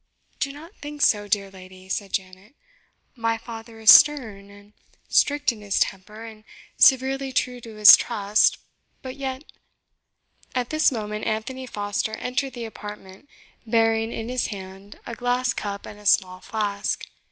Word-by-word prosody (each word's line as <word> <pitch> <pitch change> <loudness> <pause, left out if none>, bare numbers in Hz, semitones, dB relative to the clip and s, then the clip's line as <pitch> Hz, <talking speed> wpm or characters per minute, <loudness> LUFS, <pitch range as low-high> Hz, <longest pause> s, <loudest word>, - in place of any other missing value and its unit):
"Do 275 - -1
not 320 +7 -13
think 295 0 -5
so, 205 -1 +3
dear 200 -1 -1
lady," 185 0 -14
said 195 0 -4
Janet; 190 +5 -5 0.6
"my 230 -1 -1
father 225 0 -10
is 220 0 +8
stern 220 -10 +5
and 205 +1 -17 0.3
strict 290 -1 +2
in 220 -3 -12
his 200 -1 -1
temper, 210 +3 -3
and 220 -1 -12 0.3
severely 270 0 +3
true 250 -1 -2
to 225 -2 -11
his 210 -1 +10
trust 210 -2 +1 0.5
but 260 0 -7
yet 265 0 -5 0.6
" - - -34
At 250 -1 -2
this 310 -1 +3
moment 210 -3 -5
Anthony 255 +4 -4
Foster 205 0 -3
entered 255 +3 -3
the 240 -2 -6
apartment, 210 +2 -11 0.3
bearing 225 -1 +1
in 225 -1 -5
his 250 0 -1
hand 195 0 -10
a 235 - -7
glass 245 +1 -1
cup 200 -1 -5
and 210 - -11
a 210 - -6
small 185 -2 +2
flask. 205 -1 -3
225 Hz, 155 wpm, -23 LUFS, 205-255 Hz, 0.6 s, his